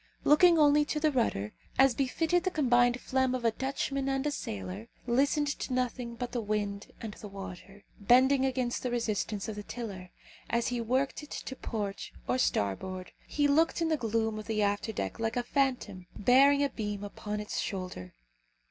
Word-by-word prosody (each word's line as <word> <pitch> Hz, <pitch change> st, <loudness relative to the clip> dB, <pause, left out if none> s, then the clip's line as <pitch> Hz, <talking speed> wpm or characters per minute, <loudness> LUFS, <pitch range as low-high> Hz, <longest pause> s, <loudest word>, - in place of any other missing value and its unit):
Looking 335 Hz, +3 st, +6 dB
only 295 Hz, -1 st, +5 dB
to 300 Hz, -, -2 dB
the 305 Hz, 0 st, +2 dB
rudder, 105 Hz, -, 0 dB, 0.2 s
as 270 Hz, -1 st, +6 dB
befitted 320 Hz, +7 st, +1 dB
the 370 Hz, -, +1 dB
combined 245 Hz, -6 st, +3 dB
phlegm 260 Hz, 0 st, +1 dB
of 245 Hz, -2 st, -4 dB
a 230 Hz, -, +4 dB
Dutchman 275 Hz, +2 st, -2 dB
and 270 Hz, +1 st, 0 dB
a 295 Hz, -, +1 dB
sailor, 100 Hz, -, -5 dB, 0.2 s
listening 280 Hz, +5 st, +2 dB
to 255 Hz, -, -3 dB
nothing 245 Hz, -1 st, -2 dB
but 240 Hz, +1 st, -4 dB
the 240 Hz, -1 st, -2 dB
wind 205 Hz, -1 st, -2 dB
and 220 Hz, -2 st, -6 dB
the 210 Hz, -, -9 dB
water, 195 Hz, 0 st, -9 dB, 0.2 s
bending 260 Hz, +6 st, +5 dB
against 255 Hz, -2 st, 0 dB
the 250 Hz, -, -2 dB
resistance 220 Hz, -3 st, -1 dB
of 220 Hz, -, -4 dB
the 210 Hz, -, -5 dB
tiller, 205 Hz, -5 st, -7 dB, 0.4 s
as 235 Hz, 0 st, +1 dB
he 245 Hz, -1 st, -2 dB
worked 260 Hz, +6 st, 0 dB
it 295 Hz, -, -11 dB
to 265 Hz, -, -6 dB
port 205 Hz, -6 st, -4 dB, 0.2 s
or 255 Hz, -, +1 dB
starboard, 185 Hz, -, -1 dB, 0.2 s
he 290 Hz, -1 st, +2 dB
looked 320 Hz, +5 st, +3 dB
in 330 Hz, -1 st, +1 dB
the 315 Hz, -, +3 dB
gloom 225 Hz, -4 st, -1 dB
of 215 Hz, -, -9 dB
the 215 Hz, -2 st, +1 dB
after 205 Hz, +2 st, 0 dB
deck 95 Hz, -, -4 dB
like 225 Hz, +1 st, -1 dB
a 245 Hz, -, +1 dB
phantom 245 Hz, -9 st, -1 dB
bearing 275 Hz, +6 st, +5 dB
a 280 Hz, -, +2 dB
beam 205 Hz, -4 st, -4 dB
upon 210 Hz, +1 st, -5 dB
its 210 Hz, -, -3 dB
shoulder. 180 Hz, -, -5 dB
240 Hz, 185 wpm, -30 LUFS, 205-270 Hz, 0.4 s, Looking